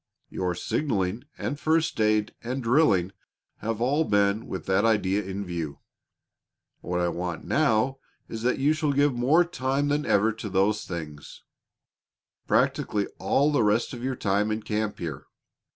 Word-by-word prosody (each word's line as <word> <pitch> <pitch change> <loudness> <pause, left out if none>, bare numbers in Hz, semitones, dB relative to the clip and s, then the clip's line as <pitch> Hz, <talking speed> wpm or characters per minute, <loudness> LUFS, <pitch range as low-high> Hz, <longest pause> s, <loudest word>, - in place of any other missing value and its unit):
Your 90 -1 -2
signaling 105 - -1
and 145 - -3
first 160 -7 +1
aid 110 0 +2
and 125 +2 -4
drilling 115 - +3 0.5
have 115 0 -3
all 140 +6 +2
been 100 -3 +1
with 95 - -5
that 95 +2 +2
idea 105 -3 +2
in 100 +1 -5
view. 85 -5 -4 1.0
What 90 0 -3
I 90 - +1
want 85 0 -4
now 135 -2 +2 0.3
is 115 - -6
that 125 +2 +1
you 145 +3 +3
shall 155 -2 0
give 145 0 +3
more 140 +9 +3
time 140 -3 -1
than 150 +2 0
ever 110 +3 +3
to 110 -1 -6
those 100 +3 +1
things 75 -5 -8 1.0
practically 105 -1 +1
all 145 +2 +2
the 145 - +2
rest 105 +4 +1
of 120 -1 -7
your 130 0 -1
time 105 -1 0
in 110 0 -2
camp 105 -1 -2
here. 80 -6 -6
110 Hz, 155 wpm, -26 LUFS, 95-135 Hz, 1.0 s, drilling